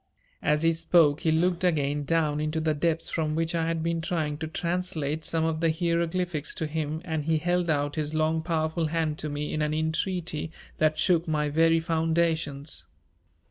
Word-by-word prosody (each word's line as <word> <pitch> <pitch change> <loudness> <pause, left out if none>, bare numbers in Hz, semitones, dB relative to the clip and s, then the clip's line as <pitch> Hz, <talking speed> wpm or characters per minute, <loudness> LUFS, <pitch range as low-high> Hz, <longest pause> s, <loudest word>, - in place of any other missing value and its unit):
As 150 +1 +2
he 165 0 +4
spoke 160 -2 +4
he 160 - +2
looked 175 +3 +1
again 145 -4 +1
down 150 -1 +1
into 155 +1 -1
the 155 -1 +1
depths 165 +2 0
from 155 -2 -1
which 165 0 0
I 165 -1 0
had 165 -1 -1
been 165 0 0
trying 155 -3 -2
to 160 - -3
translate 160 -3 -2
some 160 -1 0
of 160 -1 -1
the 165 -1 +2
hieroglyphics 170 -1 -1
to 160 - -2
him 155 +1 -3
and 160 -3 -2
he 160 0 +2
held 175 +2 0
out 145 0 0
his 150 -1 -1
long 155 +1 +1
powerful 160 0 0
hand 155 -1 -1
to 150 - -3
me 145 0 -3
in 155 - -1
an 150 0 0
entreaty 160 0 -1 0.3
that 155 -1 +3
shook 170 +1 +2
my 150 -2 0
very 165 +2 +4
foundations. 160 -3 0
160 Hz, 185 wpm, -27 LUFS, 155-165 Hz, 0.3 s, he